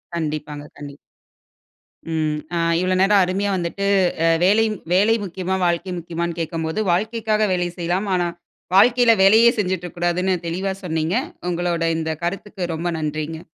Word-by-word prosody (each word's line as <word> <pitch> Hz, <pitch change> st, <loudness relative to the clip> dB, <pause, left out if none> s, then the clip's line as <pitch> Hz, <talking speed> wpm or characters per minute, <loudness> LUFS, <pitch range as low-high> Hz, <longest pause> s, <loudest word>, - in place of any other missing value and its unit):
கண்டிப்பாங்க, 150 Hz, -2 st, -4 dB
கண்டிப்பா. 145 Hz, -1 st, -9 dB, 1.1 s
ம். 155 Hz, -2 st, -1 dB, 0.2 s
ஆ -, -, 0 dB, 0.2 s
இவ்வள 185 Hz, +1 st, 0 dB
நேரம் 200 Hz, +1 st, +5 dB
அருமையா 195 Hz, +3 st, -1 dB
வந்துட்டு 180 Hz, +2 st, -3 dB, 0.4 s
அ -, -, +4 dB, 0.2 s
வேலையின் 215 Hz, +3 st, +3 dB, 0.2 s
வேலை 205 Hz, +5 st, +4 dB
முக்கியமா? 185 Hz, 0 st, -3 dB
வாழ்க்கை 175 Hz, +2 st, -1 dB
முக்கியமான்னு 170 Hz, 0 st, -4 dB
கேக்கும்போது 160 Hz, +3 st, -3 dB
வாழ்க்கைக்காக 215 Hz, +2 st, 0 dB
வேலை 180 Hz, -1 st, 0 dB
செய்யலாம். 175 Hz, +4 st, -1 dB
ஆனா, 175 Hz, -1 st, 0 dB, 0.5 s
வாழ்க்கையில 240 Hz, +3 st, +6 dB
வேலையே 220 Hz, +4 st, +7 dB
செஞ்சிட்டு 185 Hz, -3 st, -1 dB
இருக்கக்கூடாதுன்னு 175 Hz, +2 st, -1 dB
தெளிவா 185 Hz, +4 st, -2 dB
சொன்னீங்க. 160 Hz, 0 st, -1 dB, 0.4 s
உங்களோட 175 Hz, -1 st, -1 dB, 0.2 s
இந்த 160 Hz, 0 st, -2 dB
கருத்துக்கு 185 Hz, -1 st, -4 dB
ரொம்ப 170 Hz, +2 st, -3 dB
நன்றிங்க. 155 Hz, +2 st, -4 dB
175 Hz, 130 wpm, -21 LUFS, 165-195 Hz, 1.1 s, வேலையே